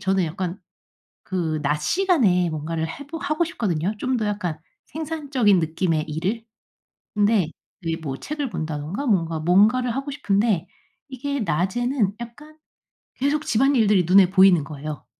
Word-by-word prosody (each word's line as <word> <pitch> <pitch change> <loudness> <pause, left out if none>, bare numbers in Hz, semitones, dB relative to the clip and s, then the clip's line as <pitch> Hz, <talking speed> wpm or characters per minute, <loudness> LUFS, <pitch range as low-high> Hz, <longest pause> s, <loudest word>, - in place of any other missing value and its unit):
저는 190 -1 +1
약간 180 +4 -4 0.7
그 165 -5 -2
낮 150 +1 0
시간에 235 - +2
뭔가를 160 +1 -3
해 280 - -8
보 325 +1 -5
하고 305 +3 0
싶거든요, 205 - -2
좀 255 +4 0
더 220 -3 -1
약간 185 -7 -2 0.3
생산적인 285 - 0
느낌의 160 -1 0
일을. 190 +9 -2 0.7
근데 205 -4 +2 0.3
이 165 -1 -2
뭐 145 -5 -5
책을 290 - -4
본다든가 160 - -4
뭔가 165 -7 +1
뭔가를 215 +9 +3
하고 275 +2 -3
싶은데 200 - 0 0.4
이게 275 +1 -3
낮에는 205 - 0
약간 295 +7 -10 0.6
계속 290 +3 0
집안일들이 225 -6 +3
눈에 185 +1 +6
보이는 190 -4 +5
거예요. 150 +1 -7
200 Hz, 295 characters per minute, -23 LUFS, 165-260 Hz, 0.7 s, 눈에